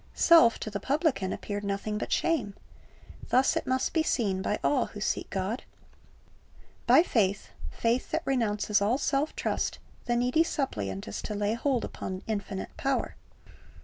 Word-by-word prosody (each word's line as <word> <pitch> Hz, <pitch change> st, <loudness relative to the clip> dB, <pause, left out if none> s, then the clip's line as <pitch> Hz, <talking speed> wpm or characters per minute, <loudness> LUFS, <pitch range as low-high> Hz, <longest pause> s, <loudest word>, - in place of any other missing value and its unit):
Self 325 Hz, -10 st, +6 dB
to 215 Hz, -, -4 dB
the 200 Hz, -, -3 dB
publican 270 Hz, -, 0 dB
appeared 205 Hz, 0 st, -4 dB
nothing 200 Hz, +1 st, -2 dB
but -, -, -5 dB
shame. 235 Hz, -13 st, 0 dB, 0.7 s
Thus 260 Hz, +2 st, +3 dB
it -, -, -2 dB
must 260 Hz, 0 st, 0 dB
be 320 Hz, -, +3 dB
seen 200 Hz, -11 st, 0 dB
by 210 Hz, +2 st, -1 dB
all 270 Hz, -4 st, +2 dB
who 210 Hz, -, -9 dB
seek 205 Hz, -, -1 dB
God. 195 Hz, +5 st, -2 dB, 1.3 s
By -, -, +7 dB
faith 200 Hz, -, 0 dB
— -, -, -6 dB
faith 235 Hz, +2 st, 0 dB
that 320 Hz, +1 st, -2 dB
renounces 210 Hz, -5 st, +1 dB
all 215 Hz, +6 st, +2 dB
self 280 Hz, +1 st, 0 dB
trust -, -, -1 dB
— -, -, -28 dB
the 240 Hz, -, +2 dB
needy 250 Hz, +6 st, +3 dB
suppliant 100 Hz, -, -3 dB
is 100 Hz, -, -5 dB
to 210 Hz, -, -4 dB
lay 205 Hz, +1 st, 0 dB
hold 245 Hz, 0 st, 0 dB
upon 185 Hz, 0 st, -6 dB
infinite 200 Hz, -3 st, -4 dB
power. 275 Hz, -1 st, -1 dB
225 Hz, 165 wpm, -28 LUFS, 200-270 Hz, 1.3 s, By